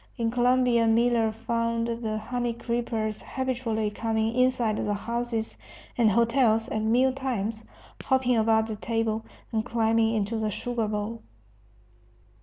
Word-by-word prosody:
In 230 -1 0
Colombia 245 -1 +3
Miller 230 0 +3
found 230 +1 -1
the 230 -2 -2
honey 240 +2 -2
creepers 230 -2 -2
habitually 240 -5 -2
coming 220 +1 -1
inside 250 -3 +2
the 205 0 -1
houses 235 +1 -3 0.4
and 230 -3 +4
hotels 230 0 +3
at 220 - -1
meal 245 +4 +3
times, 230 -5 -3 0.4
hopping 260 -2 +2
about 220 0 +3
the 220 -1 -4
table, 225 0 -1 0.3
and 220 -2 0
climbing 225 -1 +1
into 220 +1 -1
the 215 -1 0
sugar 230 +2 -2
bowl. 210 +2 -3
230 Hz, 130 wpm, -27 LUFS, 220-240 Hz, 0.4 s, and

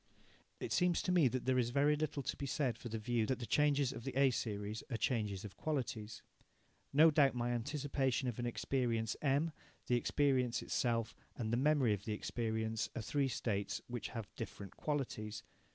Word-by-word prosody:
It - - -3
seems 180 -2 +3
to 180 - 0
me 175 -6 +5
that 130 +1 -2
there 130 0 +3
is 120 -1 +1
very 145 +4 +3
little 150 -2 -2
to - - -2
be 140 - -4
said 130 -3 0
for 120 - -8
the 115 - -2
view 110 0 0
that 130 - 0
the 120 - -5
changes 145 -1 +3
of 115 -3 -7
the - - -4
A 135 -1 +5
series 105 -2 -3
are 115 - -1
changes 105 -4 -1
of 100 - -9
qualities. 115 -8 -3 0.7
No 155 +3 +7
doubt 140 -3 +4
my 120 0 0
anticipation 135 +1 0
of 120 -1 -3
an 120 - -1
experience 115 -2 0
M, 145 +3 +2 0.3
the 125 - +3
experience 130 -3 +1
itself, 115 -2 0 0.2
and 115 -2 -2
the - - +3
memory 135 -4 +4
of 100 0 -5
the 110 - -1
experience 110 0 -2
are 115 - -2
three 140 +4 +1
states 105 -4 -1
which 120 -4 -4
have 115 -4 -7
different 100 -3 -7
qualities. 110 -8 -3
120 Hz, 190 wpm, -36 LUFS, 110-140 Hz, 0.7 s, No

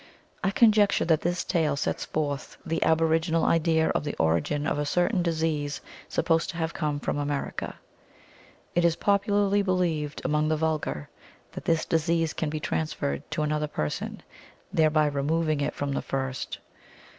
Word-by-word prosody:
I - - +3
conjecture 210 -1 +4
that 160 -2 +3
this 175 +1 -1
tale 155 -4 +1
sets 140 - -2
forth 145 -2 -3
the 165 -1 -1
aboriginal 160 +1 +2
idea 160 -1 +3
of - - 0
the 145 - -3
origin 85 - +1
of 145 - 0
a - - +1
certain 180 +4 +2
disease 160 -3 -1 0.3
supposed 165 -1 +1
to 170 - -5
have 165 -1 -1
come 150 -2 -1
from 145 - -2
America. 145 -1 -3 1.0
It 175 - +2
is 170 -1 +4
popularly 205 0 +2
believed 170 -6 0
among 150 0 +2
the 155 0 +1
vulgar 150 - -1 0.4
that - - -8
this 165 -1 +2
disease 165 0 +1
can 160 - -2
be 155 +1 -3
transferred 80 - -2
to 155 0 -1
another 150 0 0
person, 75 - -4 0.5
thereby 155 -1 +4
removing 150 +2 0
it 140 - -1
from 140 0 -2
the - - -1
first. 135 -1 -3
155 Hz, 155 wpm, -27 LUFS, 145-165 Hz, 1.0 s, conjecture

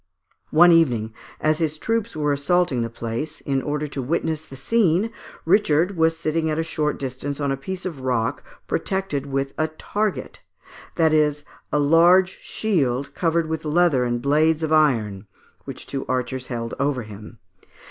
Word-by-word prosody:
One 175 +3 +6
evening, 120 -10 +3 0.3
as 155 0 +1
his 155 -2 -1
troops 225 +3 -2
were 150 -1 +1
assaulting 145 -2 +1
the 115 - -2
place, 115 +7 -5
in 135 -1 -1
order 150 +2 -2
to 140 - -4
witness 160 +3 -2
the 135 - -10
scene, 200 - +1 0.3
Richard 180 -1 +3
was 165 0 +2
sitting 160 0 -1
at 155 - -1
a 165 - +1
short 150 -2 -1
distance 135 +2 -5
on 140 -1 0
a - - +1
piece 180 +7 -6
of 160 -7 -5
rock, 125 -3 -1 0.2
protected 190 -8 -2
with 135 0 -2
a 155 - +2
target 205 +6 -3 0.5
that 160 -2 +3
is, 150 -1 +2 0.3
a - - +2
large 170 +5 +4
shield 140 - -1
covered 165 -1 +1
with 160 -1 -3
leather 155 -4 +3
and 120 -1 -2
blades 155 +3 +2
of 160 0 0
iron 110 -10 +2 0.4
which - - -7
two 135 -1 -4
archers 130 0 -2
held 115 -2 -4
over 140 -3 0
him. 105 +1 -11
150 Hz, 165 wpm, -23 LUFS, 135-165 Hz, 0.5 s, One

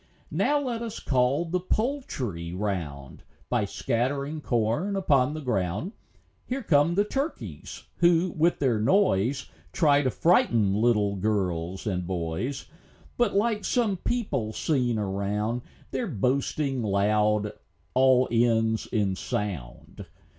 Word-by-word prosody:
Now 295 0 +2
let 245 -5 -3
us 230 -2 -5
call 130 +5 +1
the 180 +2 -1
poultry 140 - -2
round, 85 -9 -4 0.3
By 120 -4 +1
scattering 140 +8 -2
corn 120 - 0
upon 145 -7 +2
the 155 - -5
ground. 105 - -1 0.6
Here 260 +1 -3
come 160 -2 +3
the 200 - +4
turkeys, 210 - -5
who, 175 +1 +3
with 165 +2 +2
their 125 -6 +1
noise, 130 - +2 0.2
Try 145 - +4
to 130 - +1
frighten 115 - +3
little 105 -2 +2
girls 95 -3 -1
and 90 -4 -2
boys; 90 +9 -3 0.5
But, 240 -5 +1
like 210 0 +1
some 230 -6 +1
people 145 - -2
seen 125 -6 0
around, 105 +3 -1 0.3
Their 245 - -2
boasting 135 - 0
loud 105 0 +1 0.4
all 130 0 +4
ends 115 -1 +2
in 100 -5 0
sound. 90 -12 -5
125 Hz, 120 wpm, -26 LUFS, 105-165 Hz, 0.6 s, the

